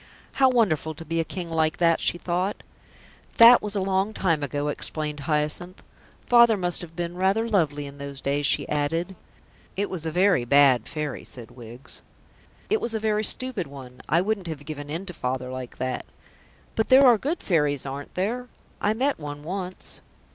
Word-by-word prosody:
"How 265 -1 +4
wonderful 165 - +1
to 165 - -9
be 165 +1 -2
a - - +2
King 175 0 -6
like 160 -1 +1
that!" 165 -1 +3
she - - +1
thought. 180 +3 -2 0.7
"That 235 +1 +9
was 210 0 -4
a 200 - 0
long 195 +3 0
time 165 -5 +1
ago," 145 +1 -2
explained 150 0 -3
Hyacinth. 150 +5 -2 0.4
"Father 235 -3 +6
must 175 -2 -1
have 165 -2 -10
been 170 0 -3
rather 195 +5 +1
lovely 155 -9 0
in 140 0 -10
those 140 -1 -7
days," 140 +1 0
she - - +1
added. 165 +5 -1 0.6
"It 200 +1 -1
was 165 -4 -3
a - - -2
very 180 -5 +3
bad 130 -2 +4
Fairy," 150 -3 -4
said 120 -3 -7
Wiggs. 120 +1 -11 0.7
"It 435 0 +1
was 225 - -1
a - - 0
very 215 0 0
stupid 240 -5 0
one. 130 -3 -11
I 165 +5 +4
wouldn't 200 -2 -2
have 150 -3 -6
given 145 -1 -7
in 165 +6 -4
to 180 - -8
Father 130 -3 -3
like 130 -1 -7
that." 130 -1 -3 0.7
"But 220 - 0
there 265 +2 +7
are 240 -4 +6
good 305 - -3
Fairies, 150 -6 +1
aren't 140 +1 -7
there? 235 +7 -2 0.3
I 210 +1 +1
met 270 +1 0
one 145 -1 -7
once." 185 +2 -6
165 Hz, 185 wpm, -25 LUFS, 145-200 Hz, 0.7 s, That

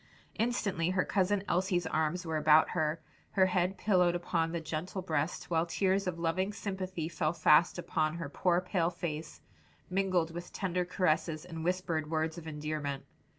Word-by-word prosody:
Instantly 205 -8 0
her 185 0 +1
cousin 195 +1 +1
Elsie's 180 -1 +1
arms 160 +3 0
were 160 -1 -1
about 155 0 +5
her, 155 -1 0 0.3
her 190 -2 +5
head 185 +1 +1
pillowed 180 -4 +3
upon 170 -2 0
the 170 - -2
gentle 165 +4 -4
breast, 160 0 -2
while 165 0 +2
tears 190 +2 +1
of 180 -2 -2
loving 175 +4 0
sympathy 190 -5 -4
fell 160 -1 -1
fast 160 +1 +4
upon 155 -2 -1
her 170 -3 -4
poor 175 +4 +1
pale 180 -2 0
face, 160 -3 -5 0.5
mingled 185 -3 +1
with 175 +1 -7
tender 180 -2 -1
caresses 160 -3 0
and 165 -2 -6
whispered 170 -3 -1
words 160 +1 -1
of 160 - -11
endearment. 150 -2 -4
170 Hz, 160 wpm, -32 LUFS, 160-185 Hz, 0.5 s, about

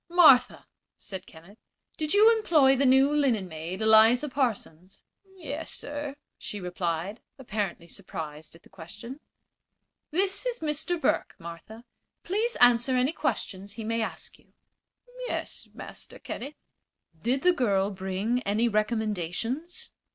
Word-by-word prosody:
"Martha," 325 -7 +6 0.3
said 190 -2 -9
Kenneth, 175 +7 -16 0.4
"did 310 -2 -3
you 435 +3 +6
employ 305 -11 +4
the 270 +1 +2
new 265 +3 +5
linen 250 -10 +1
maid, 170 +5 -5
Eliza 225 +6 +6
Parsons?" 200 - -3 0.3
"Yes, 325 -3 -5
sir," 290 -1 -5 0.2
she 205 - -6
replied, 180 +2 -3 0.2
apparently 205 -9 -4
surprised 160 -4 -8
at 165 - -18
the - - -18
question. 210 - -10 0.9
"This 385 +4 +1
is - - -1
Mr. 315 +2 -1
Burke, - - 0
Martha. 170 +7 -10 0.4
Please 440 +6 -1
answer 245 +1 +5
any 255 +5 +2
questions 200 - -3
he 225 - -7
may 230 +1 -1
ask 220 - -5
you." - - -29 0.7
"Yes, - - -4
Master - - -10
Kenneth." 285 +4 -7 0.7
"Did 255 +4 0
the 360 0 +5
girl 200 - +1
bring 195 +5 -2
any 220 +1 +1
recommendations?" 220 - -2
230 Hz, 130 wpm, -27 LUFS, 190-290 Hz, 0.9 s, Martha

